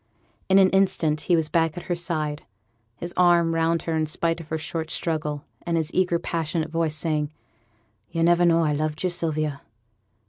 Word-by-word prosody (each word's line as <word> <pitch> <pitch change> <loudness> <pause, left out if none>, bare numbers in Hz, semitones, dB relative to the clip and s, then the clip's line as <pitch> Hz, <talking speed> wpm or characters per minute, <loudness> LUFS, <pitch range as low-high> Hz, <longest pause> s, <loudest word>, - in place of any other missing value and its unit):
In 190 - +6
an 190 -1 +6
instant 165 -6 +2
he 175 - +2
was 160 -2 +1
back 165 0 +1
at 175 - -5
her 175 - -2
side, 155 -4 -2 0.5
his 175 +6 -6
arm 175 -2 +4
round 165 0 +1
her 165 - -2
in 155 -1 0
spite 165 +2 0
of 160 - -12
her 160 - -2
short 160 0 -4
struggle, 150 -3 -2 0.2
and 170 -1 -1
his 160 0 -2
eager 180 -2 +2
passionate 160 -1 -2
voice 165 -2 0
saying, 155 -2 -1 0.8
'Yo' 165 - -1
never 175 +1 +4
knowed 170 -1 +4
I 150 - +1
loved 155 +2 -2
you, 180 - +1
Sylvia? 155 -4 -2
165 Hz, 185 wpm, -24 LUFS, 155-170 Hz, 0.8 s, In